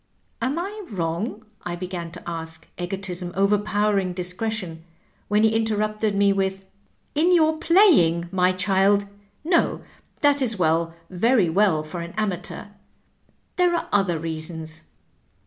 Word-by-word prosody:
" - - -43
Am 260 +6 0
I 400 +5 -4
wrong? 195 +3 -3
" - - -41
I 175 - -3
began 175 -1 -5
to - - -10
ask, 160 -1 -6
egotism 180 -1 -4
overpower 205 +1 +2
ing 185 -2 -2
discretion, 180 -1 -4 0.4
when 210 +1 +2
he 220 0 +3
interrupted 215 -1 0
me 200 0 +4
with, 195 0 -2 0.2
" - - -42
In 350 +3 +4
your 315 -1 +3
playing, 290 - +4
my 185 -1 +3
child? 195 +2 +2 0.4
No, 335 +2 +1 0.4
that 290 -2 +4
is 230 -5 +1
well, 165 -1 +1 0.2
very 200 0 +3
well 185 -4 +3
for 170 +3 -6
an 170 0 -7
amateur. 205 -1 -3 0.9
There 355 -1 +3
are 335 - -3
other 195 -5 +2
reasons." 160 0 -5
195 Hz, 145 wpm, -23 LUFS, 175-220 Hz, 0.9 s, me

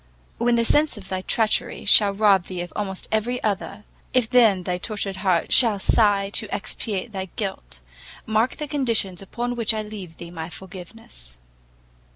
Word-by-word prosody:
when 240 +1 +2
the 235 0 +2
sense 295 0 +3
of 195 -2 -10
thy 185 0 -3
treachery 220 +3 -1
shall 205 0 +6
rob 195 -3 +3
thee 180 -2 -5
of 175 - -8
almost 195 -2 -4
every 220 +3 0
other, 200 0 -3 0.3
if 250 -3 +3
then 225 -7 +4
thy 180 0 -2
tortured 200 -1 -3
heart 185 -3 +1
shall 225 -5 +6
sigh 200 -1 +2
to 215 0 -2
expiate 205 +1 -4
thy 190 -2 -4
guilt, 65 - -5 0.4
mark 220 +3 +1
the 300 - -5
conditions 230 - 0
upon 240 +5 -4
which 230 -2 +1
I 215 - -2
leave 200 -6 -9
thee 170 0 -9
my 165 -1 -6
forgiveness. 180 - -11
205 Hz, 170 wpm, -23 LUFS, 185-225 Hz, 0.4 s, shall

